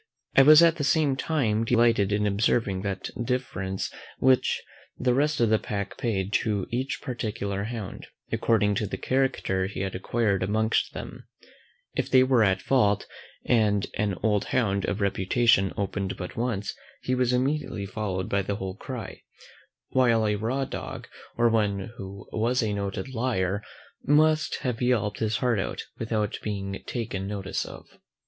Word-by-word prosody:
I - - +9
was 155 +4 +9
at 165 0 +5
the 150 - -2
same 145 -1 +3
time 130 -7 0
delighted 115 -4 +3
in 105 +1 +1
observing 100 -1 +1
that 100 -1 -4
deference 95 -7 -2 0.2
which 130 0 +3 0.4
the 125 -1 +2
rest 150 +3 +1
of 115 -2 +3
the 110 - +4
pack 100 -1 -4
paid 100 -4 -2
to 105 -4 -1
each 130 +3 -2
particular 105 -5 -3
hound, 110 -4 -6 0.2
according 105 -2 +2
to 105 - -1
the - - -4
character 130 -8 0
he 100 - -5
had 95 -1 -2
acquired 100 0 0
amongst 110 +4 +1
them: - - -8 0.7
If - - -2
they 130 -1 +6
were 130 -3 +4
at 95 -2 +2
a - - -20
fault, 105 -7 +2 0.4
and 105 -4 +3
an 105 -2 0
old 105 -2 +2
hound 100 -6 0
of 100 - -2
reputation 100 +1 +3
opened 100 -1 -2
but 90 - -6
once, 115 -4 -2 0.3
he 130 - 0
was 125 -1 +2
immediately 130 -5 0
followed 95 -2 -3
by 100 - +1
the 100 +1 -2
whole 95 -2 -4
cry; 125 0 -7 0.7
while 115 -4 +3
a 105 - +2
raw 120 +6 -1
dog, - - -6 0.3
or 120 0 +4
one 105 -3 0
who 95 0 -8
was 120 +3 +1
a 105 -2 0
noted 100 +6 -4
LIAR 105 -5 0 0.4
might 155 +1 +3
have 125 -3 -2
yelped 110 -5 +1
his 110 0 0
heart 120 -4 +1
out, - - -3 0.2
without 110 -2 -1
being 100 -2 -4
taken 100 -5 -3
notice 100 -1 -3
of. - - -11
110 Hz, 160 wpm, -26 LUFS, 100-125 Hz, 0.7 s, I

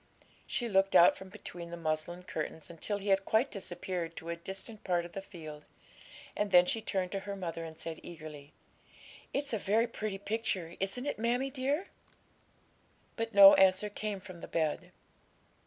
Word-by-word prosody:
She 240 - 0
looked 195 -2 +3
out 175 - +8
from 190 - -10
between 175 -4 -8
the 170 - -6
muslin 165 +2 -2
curtains 160 -1 -5
until 185 +5 -2
he 200 0 -4
had 195 0 +4
quite 225 +7 +2
disappeared 175 -3 -4
to 165 - -7
a 170 - -1
distant 195 +5 -6
part 175 -2 +1
of 175 - -10
the 195 - -5
field, 155 -6 -10 0.7
and 210 0 0
then 180 -2 +7
she 225 +5 -1
turned 190 -4 -2
to 195 - -1
her 200 +1 -5
mother 170 -3 -4
and 160 -1 -8
said 165 -1 -5
eagerly 155 -3 -10 0.8
'It's 280 -2 -2
a 220 - +1
very 215 +4 +2
pretty 215 -4 -4
picture, 200 -5 -2
isn't 195 +7 -2
it, 290 - -2
mammie 245 +4 +1
dear?' 285 +7 -1 1.3
But 230 -2 -3
no 200 0 +11
answer 190 +2 +4
came 210 -1 -3
from 185 -2 -11
the - - -8
bed. 155 -3 -1
190 Hz, 175 wpm, -32 LUFS, 170-215 Hz, 1.3 s, no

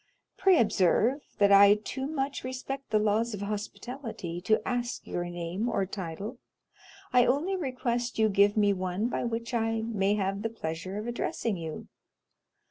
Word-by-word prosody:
Pray 380 -3 +4
observe, 230 - +3 0.2
that 200 -1 +4
I 200 +1 +8
too 265 +5 -4
much 280 -2 -2
respect 260 +1 -5
the 215 - +3
laws 215 +2 +1
of 200 - -7
hospitality 210 -3 -5
to 215 +1 +2
ask 245 -1 -2
your 175 - -3
name 175 +6 -3
or 195 - 0
title. 195 +5 -6 0.7
I 250 -1 +6
only 300 +10 +1
request 250 -6 -2
you 220 0 +4
to 210 - -2
give 205 +1 +4
me 205 -1 +4
one 185 +4 -1
by - - -2
which 235 +1 -3
I 225 -1 0
may 205 -3 +1
have 195 -1 -1
the 225 - -1
pleasure 185 -2 -5
of 210 - -4
addressing 235 -2 -2
you. 160 -3 -6
220 Hz, 165 wpm, -29 LUFS, 195-245 Hz, 0.7 s, I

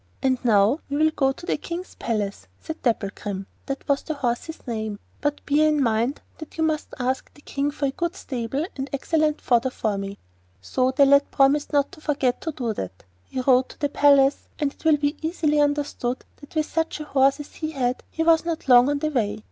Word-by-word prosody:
'And 260 -1 +1
now 220 +4 +4
we 285 - -1
will 315 +1 +4
go 270 -3 +2
to 295 - -10
the - - 0
King's 350 +1 -6
palace,' 205 - -3
said 320 - -7
Dapplegrim—that 205 +2 -3
was 280 -1 +2
the 315 - -4
horse's 265 +4 -3
name, 220 -4 -3 0.2
'but 290 0 -2
bear 300 +2 +4
in 300 -1 +2
mind 235 +4 0 0.2
that 315 0 -10
you 320 - +1
must 310 -1 0
ask 255 +1 -2
the 290 - -17
King 280 0 -2
for 290 0 -2
a 270 - +1
good 340 +5 -2
stable 265 +2 -3
and 270 0 -4
excellent 305 +2 +1
fodder 245 +1 +2
for 215 -5 -2
me.' 195 0 -5 0.4
So 255 - 0
the 275 +2 +5
lad 280 +1 +5
promised 280 +2 +3
not 285 -2 +2
to 345 -5 -14
forget 275 -5 0
to 320 - -3
do 245 -6 -2
that. 95 - -6 0.2
He 255 - -4
rode 255 0 +4
to - - -14
the 290 -3 0
palace, 280 -1 +4
and 290 -2 -1
it - - -22
will 315 -2 +5
be 290 +1 -1
easily 315 -2 +1
understood 290 -4 0
that 290 +2 -15
with 310 -1 +2
such 320 0 -2
a - - -4
horse 275 -1 +3
as 295 - -9
he 310 - -4
had 255 -4 -1
he 325 - -2
was 325 -1 +5
not 335 -3 -4
long 250 +1 +7
on 290 - +1
the 305 +2 -1
way. 215 -6 0
280 Hz, 215 wpm, -24 LUFS, 245-300 Hz, 0.4 s, long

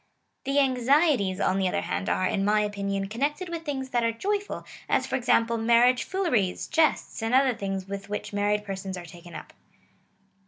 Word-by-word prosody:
The 275 +1 0
anxieties, 260 - +3
on 190 +1 +1
the 190 - +2
other - - -1
hand, - - -3
are, 185 - +1
in 195 - 0
my 210 +1 +3
opinion, 200 -1 -2
connected 290 - -2
with 335 -1 -4
things 265 -3 -4
that 240 -1 +1
are 230 - +2
joyful, 405 - -3 0.2
as - - +2
for - - -2
example 235 -2 +2
mar 235 +1 +4
riage 250 0 +3
fooleries, 250 - 0
jests, 320 -6 +1
and 225 +3 +1
other 265 -1 +4
things 195 -3 -4
with 200 0 -6
which 210 0 -5
married 205 +1 0
persons 190 -1 -5
are 175 - -8
taken 175 0 -12
up. - - -9
225 Hz, 190 wpm, -26 LUFS, 195-265 Hz, 0.2 s, mar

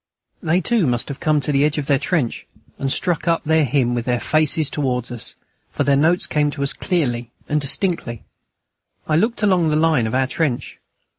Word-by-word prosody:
They 170 +1 +1
too 215 -3 +1
must 120 +1 -1
have 140 - -6
come 155 -2 +1
to 145 - -1
the 140 0 +2
edge 150 +1 +1
of 150 - -2
their 140 -1 +2
trench 150 -6 -2 0.3
and 135 -1 -1
struck 175 +3 0
up 165 -1 +1
their 160 0 +2
hymn 130 -3 +1
with 120 -1 -2
their 125 -1 0
faces 155 +1 +2
towards 125 -5 -2
us, 120 -2 -5 0.3
for - - -2
their 140 - +3
notes 165 +5 +2
came 150 -1 +1
to 140 -1 -4
us 140 - 0
clearly 125 - -2 0.2
and 150 0 0
distinctly. 140 - -1 0.8
I 155 - +1
looked 220 +6 0
along 180 -5 +3
the 150 - +1
line 155 -7 +2
of 110 - -3
our 130 0 +2
trench. 135 -2 -3
150 Hz, 205 wpm, -20 LUFS, 130-160 Hz, 0.8 s, their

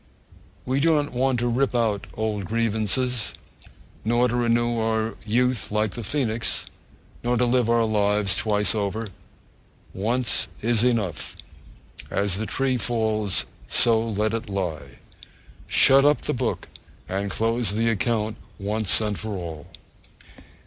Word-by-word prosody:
We 130 +2 0
do 160 +2 +3
not 145 -1 0
want 125 0 +1
to 120 - 0
rip 125 +2 0
up 110 -4 0
old 105 -3 -2
grievances, 115 +2 -1 0.7
nor 120 +3 +2
to 120 - -2
renew 120 -1 +1
our 110 0 -1
youth 125 +1 +1
like 105 -1 0
the 120 - -6
phoenix, 115 -2 -1 0.6
nor 120 0 +1
to 125 - +3
live 120 -1 +2
our 115 -1 +3
lives 105 -3 +2
twice 105 -1 +1
over. 105 +1 -2 0.8
Once 120 +6 0 0.2
is 115 0 +2
enough. 110 - 0 0.7
As 100 -1 0
the 110 - -3
tree 130 +4 0
falls, 110 -4 0 0.2
so 115 -2 +5
let 105 +1 0
it 115 -1 -4
lie. 90 -6 -4 0.7
Shut 135 +1 +6
up 145 +1 +3
the - - -1
book - - -2 0.4
and 100 +2 -2
close 115 0 0
the 115 +1 +1
account 110 0 -1 0.2
once 105 0 0
for 105 0 -2
all! 80 -4 -7
110 Hz, 135 wpm, -24 LUFS, 105-120 Hz, 0.8 s, Shut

